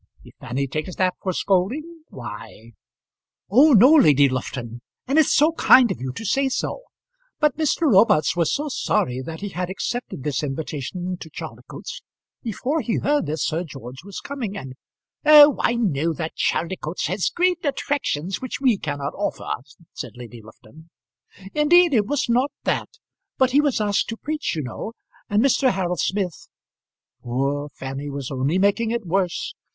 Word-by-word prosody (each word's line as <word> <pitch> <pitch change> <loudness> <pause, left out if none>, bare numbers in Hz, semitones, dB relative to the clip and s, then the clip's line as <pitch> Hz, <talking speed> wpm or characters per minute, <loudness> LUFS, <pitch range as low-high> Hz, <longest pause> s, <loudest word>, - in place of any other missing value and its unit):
If - - -15
Fanny 135 +4 -2
takes 155 +6 -4
that 185 -1 +1
for 190 - -1
scolding, 275 - -1
why 115 -1 -10 0.4
" - - -65
"Oh! 280 +7 +6
no, 250 +7 +7
Lady 145 - +6
Lufton; 120 -2 -5 0.3
and 280 +4 +3
it's 315 - +4
so 300 +3 +4
kind 260 -6 +5
of 120 - -5
you 130 0 -3
to 225 - -7
say 270 +6 +1
so. 265 - -3 0.6
But 300 -4 +2
Mr. 315 0 0
Robarts 205 - +4
was 170 -3 +1
so 295 +2 -1
sorry 125 - -1
that 160 +5 -7
he 205 - -4
had 180 -1 -4
accepted 195 - -4
this 145 -2 -1
invitation 155 +5 -4
to 160 - -10
Chaldicotes, - - -8 0.4
before 260 +7 -2
he 230 - -1
heard 290 - +1
that 155 -1 -3
Sir 165 +6 -1
George 130 -4 -10
was 200 0 -8
coming, 245 -8 -5
and 130 -7 -7 0.3
" - - -65
"Oh, 300 -1 +8
I 235 - +2
know 165 -8 0
that 160 +1 -5
Chaldicotes 170 -1 -2
has 185 +4 0
great 355 0 0
attractions 225 - -2
which 255 - -5
we 250 -7 +2
cannot 145 -2 -4
offer," 205 - -3 0.4
said - - -7
Lady 120 -1 -10
Lufton. 130 +9 -17 0.6
"Indeed, 335 +2 +5
it 210 -4 +2
was 290 +1 0
not 250 +4 +2
that. - - -1 0.5
But 260 -1 +3
he 285 +3 +5
was 285 -6 0
asked 205 -1 0
to 225 - -4
preach, 300 - -3
you 155 - -2
know; 135 - -6 0.4
and 205 +2 +3
Mr. 270 0 +3
Harold 180 -3 -1
Smith 190 -3 -2 0.4
" - - -59
Poor 140 +4 -2
Fanny 135 +1 -6
was 140 -1 -5
only 135 +6 0
making 200 +4 +2
it 235 -2 -2
worse. 180 0 -1
190 Hz, 170 wpm, -22 LUFS, -, 0.6 s, Oh